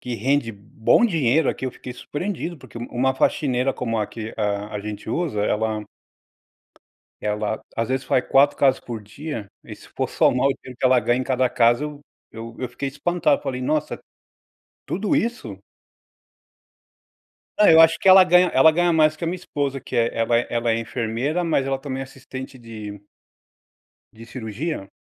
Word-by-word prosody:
que 125 -1 -5
rende 125 +1 0
bom 110 - +1
dinheiro 160 - +2
aqui; - - -3
eu - - -3
fiquei 125 - -9
surpreendido, 170 +6 -5
porque 120 - -11
uma 120 - -5
uma 130 +2 +1
faxineira 130 -1 +1
como 115 -2 -3
a 105 - 0
que 110 +1 -7
a 105 0 -2
a - - -4
gente 105 0 -7
usa, 160 -10 -1
ela 110 0 -1 1.4
ela, 105 +1 -2
às 115 0 -1
vezes, 130 +1 -1
faz 125 - +1
4 140 +2 +4
casas 135 -1 +3
por 115 -3 -7
dia 115 +1 -7 0.2
e - - -9
se - - -16
for - - -3
somar 125 +2 +3
o 140 - +1
dinheiro 125 -1 -11
que - - +1
ela 130 -1 +5
ganha 120 +2 +1
em - - -1
cada 130 -1 +1
casa 120 +3 +3
eu 150 -1 -6 0.3
eu 115 +1 -8
eu 125 - -2
fiquei 135 +3 -4
espantado. 150 +1 +1
Eu - - -22
falei: 130 -1 -3
"Nossa, 150 +3 -1 0.9
tudo 200 +3 -1
isso?". 135 - -2 2.0
Não, 210 - +6
eu 160 - +7
acho 165 0 +6
que 195 - +4
ela 190 0 +9
ganha 180 +1 +5
ela 135 +4 +7
ganha 175 +2 +2
mais 155 -1 +3
que 155 - -9
a - - 0
minha 175 - -1
esposa, 145 -6 -3
que - - -8
ela 115 0 +3
ela 115 +1 +1
é 120 - -1
ela 120 -1 0
é 115 - +1
enfermeira, 120 +7 -2
mas 155 -5 +1
ela 135 0 -1
também 135 -1 -5
é - - -2
assistente 130 0 -9
de 110 -3 -9 1.1
de 115 +1 -13
cirurgia. 115 +1 -5
130 Hz, 185 wpm, -22 LUFS, 115-150 Hz, 2.0 s, ela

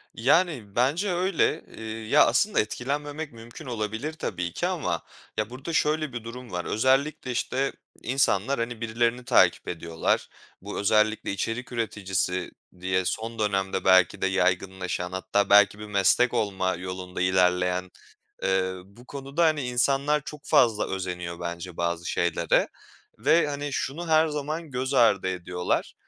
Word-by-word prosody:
Yani, 130 - +1
bence 155 - +1
öyle, 180 0 +1
iii, 110 0 -6
ya, 150 - +6
aslında 210 0 +2
etkilenmemek 145 +7 -3
mümkün 115 +2 -11
olabilir 110 +5 -3
tabii 90 - -4
ki - - -1
ama - - -2 0.4
ya, 110 +1 -1
burada 135 +7 -6
şöyle 155 -3 +1
bir 120 -2 -5
durum 120 +1 -9
var: 90 0 -3
Özellikle, 130 +4 +1
işte, 130 +3 -1 0.3
insanlar, 130 -1 +1
hani, 115 0 -3
birilerini 120 +2 0
takip - - +4
ediyorlar. 80 -1 -1 0.3
Bu 100 +2 -5
özellikle 105 +1 +2
içerik 115 +6 -3
üreticisi 95 -5 -2 0.3
diye 95 0 0
son 115 +2 -3
dönemde 95 -2 0
belki 95 0 +5
de 95 - +2
yaygınlaşan 95 -1 -1
hatta 100 +2 0
belki 105 0 +6
bir 105 - -7
meslek 105 +5 +3
olma 95 -5 0
yolunda 90 0 -6
ilerleyen, 90 0 +2 0.5
ııı, 95 -1 0
bu 120 +6 -18
konuda, 140 +4 -1
hani, 155 -3 +2
insanlar 140 +4 +1
çok 150 -2 -8
fazla 115 -7 +3
özeniyor 90 -2 -4
bence 85 0 -6
bazı 85 0 -2
şeylere 85 -1 +1 0.5
ve, 170 -2 +4
hani, 145 0 -4
şunu 160 +7 -3
her 160 0 +4
zaman 150 +2 -4
göz 130 +2 -2
ardı 100 -6 +4
ediyorlar. 90 -1 -2
110 Hz, 140 wpm, -26 LUFS, 95-135 Hz, 0.5 s, ya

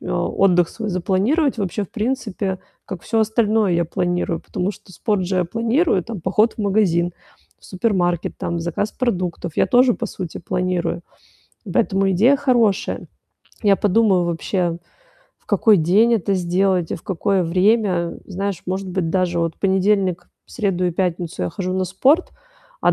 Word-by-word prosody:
отдых 180 -3 +1
свой 220 -2 -6
запланировать 205 - +1
вообще, 200 0 -2
в - - -17
принципе, 210 -5 -2 0.3
как 185 -4 -7
всё 225 0 0
остальное 220 -2 +2
я 170 0 +2
планирую. 175 0 -1
Потому 185 +3 -3
что 190 - -17
спорт 205 -1 -1
же 185 +1 -2
я 180 - +2
планирую, 230 - +1
там, 220 -2 -7
поход 210 +6 +2
в - - -32
магазин, 190 -4 +1 0.5
в - - -23
супермаркет, 180 -4 -1
там, 170 0 -3
заказ 170 +5 -2
продуктов 180 -8 -3
я - - +3
тоже, 250 -1 +4
по - - -4
сути, 180 -4 -6
планирую. 180 -1 -2 0.7
Поэтому 195 -1 +1
идея 235 +10 +4
хорошая. 240 -8 +1 0.6
Я 200 -2 +5
подумаю 200 -3 +2
вообще, 170 0 -1 0.6
в - - -37
какой 220 -3 +4
день 200 +8 +4
это 200 -2 0
сделать 180 -1 +1
и - - -2
в - - -16
какое 190 0 0
время. 185 0 +1
Знаешь, 195 -1 -4
может 190 +1 -3
быть, 180 -2 -2
даже 180 -1 0
вот 165 -1 -1
в - - -40
понедельник, 190 -2 +1 0.2
среду 195 -5 -1
и - - +1
пятницу 175 - -2
я 90 - -2
хожу 185 -1 -3
на 185 0 0
спорт, 270 - +2 0.5
а, - - +4
190 Hz, 160 wpm, -20 LUFS, 175-215 Hz, 0.7 s, Я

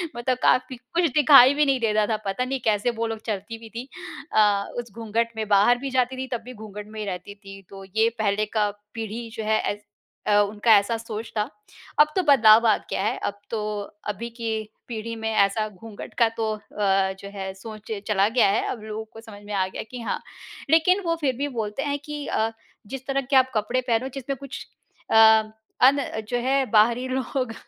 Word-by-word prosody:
मतलब 245 +1 -1
काफ़ी 255 0 +3 0.2
कुछ 340 -2 +3
दिखाई 280 -3 +8
भी 295 +1 +3
नहीं 270 -2 +2
देता 215 -2 +2
था, 220 - 0
पता 195 +6 -1
नहीं 265 0 -2
कैसे 215 +2 +2
वो 230 - +1
लोग 225 -1 -4
चलती 215 +1 -4
भी 225 0 -12
थीं। 240 +2 -5 0.5
अ, 205 -2 +4
उस 235 -3 -7
घूँघट 230 +1 -1
में 220 -1 -3
बाहर 205 +4 +5
भी 275 +2 -5
जाती 255 +1 0
थी 260 0 -4
तब - - -18
भी 255 - -8
घूँघट 210 -1 -9
में 215 0 -9
ही 210 - -3
रहती 190 +1 -6
थी 195 -1 -12
तो 195 0 -10
ये 225 +1 +4
पहले 210 0 +1
का 210 -1 +3 0.2
पीढ़ी 225 +1 -5
जो 225 - -4
है 215 0 +2
ऐस 205 0 -3 0.4
अ, - - +2
उनका 210 +3 +1
ऐसा 205 +3 0
सोच 225 0 -7
था। 210 - +1 0.5
अब 300 - +8
तो 375 - +3
बदलाव 230 -6 +6
आ 215 - +5
गया - - -1
है। 220 +5 0
अब 205 0 -4
तो, 210 -2 -3 0.3
अभी 220 +3 -4
की 230 -1 -5 0.4
पीढ़ी 230 -1 -5
में 220 0 -3
ऐसा 215 +1 +2
घूँघट 210 +1 -11
का 230 - +6
तो 220 -1 0
अ, - - -12 0.6
जो 200 - -9
है 190 -1 -5
सोच 215 +2 -10 0.2
चला 200 -1 +3
गया 235 -2 +4
है। 200 - +1
अब 230 - -6
लोगों 220 0 -5
को 225 - -10
समझ 210 -3 -12
में 210 - -6
आ 190 -2 +1
गया 185 - -6
कि 250 - -6
हाँ। 230 - -2 0.5
लेकिन 345 +5 +4
वो 335 - +1
फिर 265 -4 +1
भी 285 - -1
बोलते 230 -1 -3
हैं 285 -1 -1
कि 295 -1 -5
अ, 220 +1 0 0.4
"जिस 265 +2 -7
तरह 275 0 0
के - - +4
आप 260 0 +5
कपड़े 240 +5 0
पहनो 235 +3 +1
जिसमें 270 +1 -4
कुछ 275 0 -8 0.5
अ, - - +3 0.7
अन 270 +3 +6 0.3
जो 245 - 0
है 270 0 +2
बाहरी 235 +3 +4
लोग 255 -1 -2
225 Hz, 210 wpm, -24 LUFS, 210-255 Hz, 0.7 s, दिखाई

